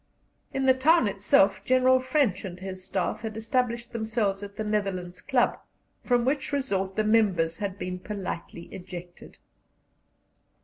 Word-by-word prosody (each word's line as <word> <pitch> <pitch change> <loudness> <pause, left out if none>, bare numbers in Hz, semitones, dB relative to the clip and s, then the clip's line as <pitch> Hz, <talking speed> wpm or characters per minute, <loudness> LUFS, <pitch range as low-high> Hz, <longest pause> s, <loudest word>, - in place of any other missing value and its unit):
In 270 0 -1
the 260 - +7
town 275 0 +4
itself 195 -1 +3
General 255 +2 +4
French 255 - +1
and 185 -2 -7
his 185 0 -7
Staff 190 - -2
had 220 -1 -5
established 235 +1 -1
themselves 220 -3 -1
at 200 0 -8
the 220 - -3
Netherlands 195 -4 -2
Club, 260 -3 +1 0.4
from 245 -1 +2
which 280 +3 0
resort 195 -9 -1
the 215 - +1
members 190 -7 +2
had 200 -2 -3
been 180 -2 -4
politely 185 -4 -6
ejected. 180 -2 -10
210 Hz, 140 wpm, -27 LUFS, 190-250 Hz, 0.4 s, the